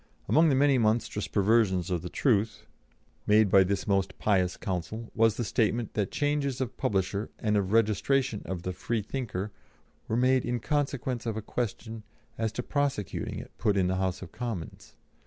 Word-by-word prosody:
Among 160 +1 +5
the 135 - +3
many 140 -1 +4
monstrous 110 -2 0
perversions 100 -3 +2
of 85 -2 0
the 90 - -6
truth 110 - +1 0.6
made 105 -1 +5
by 95 -1 +7
this 95 +1 -1
most 95 -2 0
pious 95 -4 +1
counsel, 100 +4 -4
was 115 -1 +3
the 120 - -1
statement 115 0 0
that 105 -3 0
changes 145 -3 -1
of 130 -2 -3
publisher, 100 +1 -1
and 105 -1 0
of 100 -2 0
registration 115 +3 +2
of 90 -2 -4
the 90 - -3
Freethinker 110 -1 -3 0.6
were 110 - 0
made 130 +1 +3
in 120 0 -1
consequence 135 -4 -1
of 110 -1 -2
a - - -2
question 115 0 -4 0.3
as 110 -1 -1
to 125 - -3
prosecuting 140 - -2
it - - -8
put 105 -2 +2
in 95 - +3
the 95 +1 0
House 95 0 -1
of 85 - -10
Commons. 115 -9 -6
110 Hz, 175 wpm, -28 LUFS, 95-125 Hz, 0.6 s, by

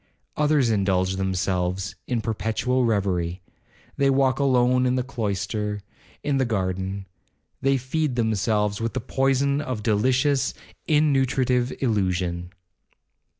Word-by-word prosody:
Others 150 -5 +3
indulge 95 -2 +1
themselves 95 0 -1
in 120 -3 0
perpetual 115 +3 0
reverie. 95 -5 0 0.5
They 140 0 +3
walk 135 0 +2
alone 125 -2 +3
in 125 - +1
the 125 - 0
cloister,—in 105 +2 -4
the - - +3
garden. 95 -3 -2 0.6
They 135 0 +3
feed 130 +2 -1
themselves 105 -2 0
with 115 -1 -2
the - - +1
poison 135 +3 +1
of 130 -7 -4
delicious, 130 +6 +2 0.3
innutritive 130 -4 +2
illusion. 90 -6 0
115 Hz, 110 wpm, -24 LUFS, 100-130 Hz, 0.6 s, Others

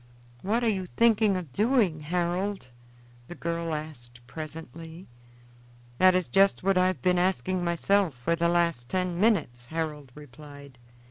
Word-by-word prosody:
"What 225 +5 0
are - - +2
you 190 -4 -1
thinking 220 -4 +4
of 165 -8 -8
doing, 210 - +2
Harold?" 175 +1 -2 0.6
the 175 - -9
girl 170 -1 -3
asked 120 -6 -9
presently. 160 +4 -9 0.9
"That 185 0 +6
is 185 -2 0
just 195 -1 +3
what 195 0 +2
I 185 0 +4
have 185 - -3
been 180 -1 +3
asking 185 0 0
myself 175 -1 +1
for 125 +7 -1
the 170 0 +1
last 170 -8 0
ten 180 0 -2
minutes," 155 - +1
Harold 150 -3 -4
replied. 145 -2 -13
170 Hz, 145 wpm, -27 LUFS, 150-185 Hz, 0.9 s, That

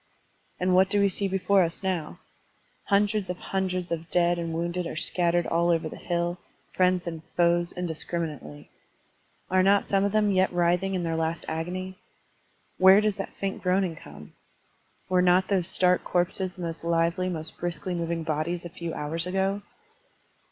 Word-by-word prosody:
And 185 0 +1
what 190 +1 +5
do 205 - +2
we 200 0 +4
see 200 +1 -1
before 195 +1 +2
us 170 +2 -2
now? 180 -5 -2 0.7
Htmdreds 205 -1 +2
of 180 - -3
htmdreds 185 -2 -3
of 165 0 -3
dead 175 0 +2
and 165 -1 -3
wounded 170 +1 -2
are - - -6
scattered 170 +1 +2
all 170 +1 +1
over 165 -1 +1
the - - -8
hill, 175 0 -2 0.3
friends 180 -1 +2
and 165 -2 -5 0.2
foes 175 0 +3
indiscriminately. 160 - -5 0.8
Are 185 0 +4
not 195 +2 +4
some 195 -1 +1
of 200 - +1
them 210 -1 +2
yet 190 0 +2
writhing 175 +2 +1
in 180 - -1
their 165 -1 -1
last 160 0 -2
agony? 185 +4 -4 0.8
Where 190 +2 +8
does 215 -1 0
that 195 - -6
faint 195 -1 -4
groaning 185 -2 +1
come? 75 - -13 0.7
Were 185 -1 +3
not 180 +1 +3
those 185 -4 +1
stark 180 -1 +2
corpses 180 +1 -1
the 180 - -7
most 165 -1 -5
lively, 170 +2 +1
most 160 -2 -5
briskly 175 +1 -3
moving 170 -1 -2
bodies 160 +3 -2
a - - -5
few 170 -1 -6
hours 165 +4 -2
ago? 195 +2 0
175 Hz, 170 wpm, -26 LUFS, 170-190 Hz, 0.8 s, Where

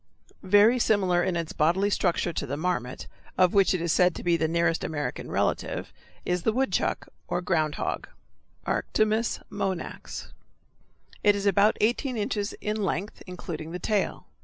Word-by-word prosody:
Very 205 +6 +5
similar 190 -6 +3
in 180 0 0
its 165 -2 -3
bodily 180 +7 +2
structure 175 -2 +1
to 140 - -3
the 140 +3 -3
marmot, 155 -7 -2 0.3
of 185 -1 +4
which 195 -2 +4
it 180 - -2
is 170 - +1
said 180 -1 +4
to - - -7
be 175 -1 +3
the 160 -1 +1
nearest 170 0 +1
American 145 -2 -3
relative, - - -1 0.3
is 180 0 0
the 220 - +2
woodchuck 260 +4 0 0.2
or 175 - -1
ground 155 -4 0
hog - - -3 0.6
(Arctomys 215 +1 0
monax). 195 -3 -4 0.9
It 205 -1 +5
is 200 0 -3
about 200 +2 +4
eighteen 240 +3 +1
inches 205 -1 -2
in 210 0 -2
length, 195 +2 -3
including 165 -3 -6
the - - -2
tail. 205 +1 -1
185 Hz, 160 wpm, -27 LUFS, 170-205 Hz, 0.9 s, Very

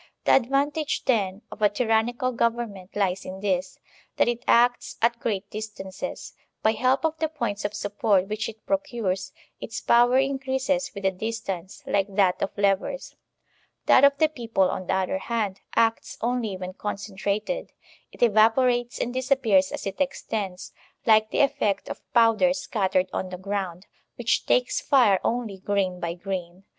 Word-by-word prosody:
The - - +4
advantage, 280 +4 +1
then, 205 -5 0
of - - -10
a 210 - +5
tyrannical 240 +3 +1
government 230 -6 -2
lies 195 -2 0
in 190 +1 -7
this, 190 -2 -1 0.4
that - - +4
it 240 0 -1
acts 245 +1 +3
at 235 +1 +2
great 200 -4 -2
distances. 210 -3 -6 0.3
By 220 - +5
help 255 +7 +1
of 320 0 -1
the 315 - 0
points 235 -10 -3
of 205 0 -2
support 205 -2 +1
which 215 +1 -3
it 220 -1 -13
procures, 235 -11 -2 0.3
its 220 - -5
power 240 +2 +4
increases 270 0 0
with 200 - -7
the 190 - +3
distance, 195 -3 -5
like 195 0 0
that 190 -3 +3
of - - 0
levers. 200 +7 0 0.7
♦ - - -53
That - - +6
of 280 0 +6
the 315 - +4
people, 230 -10 0
on 185 - -5
the - - +1
other 190 0 -1
hand, 210 -3 -2
acts 225 0 +1
only 235 -4 -1
when 185 0 -6
concentrated; 205 - -3 0.4
it - - -16
evai>orates 240 +2 +3
and 245 - -2
disappears 255 -8 +2
as - - -5
it 195 +6 -4
extends, 210 -9 -3 0.3
like 220 -1 +5
the - - +1
effect 215 -7 +1
of - - -6
powder 235 +3 +4
scattered 195 -9 0
on 185 - -2
the 180 - -6
ground, 190 -1 -4 0.3
which - - 0
takes - - +2
fire 235 -9 +4
only 225 -5 -2
grain 190 -2 -1
by 170 -1 -3
grain. 180 0 -5
215 Hz, 160 wpm, -25 LUFS, 195-245 Hz, 0.7 s, That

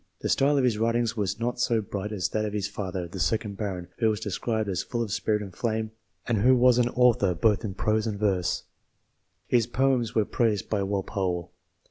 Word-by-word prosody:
The - - -2
style 145 +1 +3
of 135 - +2
his 115 -4 +1
writings 115 0 +1
was 100 -2 -2
not 120 +1 -2
so 115 -2 +2
bright 100 0 -4
as 100 -4 -1
that 110 - -1
of 105 -1 -3
his 100 -2 -1
father, 95 -3 -4
the 95 +3 -8
second 100 +6 0
baron, 95 -4 -4
who 110 -2 +3
was 105 -1 -1
described 110 +1 -2
as 95 -3 -1
full 120 -1 -2
of 105 - -5
spirit 105 +1 0
and 95 -3 -10
flame, 110 -2 -2 0.4
and 115 -3 +1
who 130 +5 +5
was 125 0 +5
an 120 0 +3
author 120 -7 +3
both 105 +4 +2
in 100 -4 -4
prose 110 +2 0
and 105 -2 -2
verse; 95 -4 0 0.8
his 120 -2 +2
poems 125 -2 +1
were 110 -2 +3
praised 110 -4 0
by 105 -2 +1
Walpole. 95 -3 -2
110 Hz, 210 wpm, -27 LUFS, 100-115 Hz, 0.8 s, who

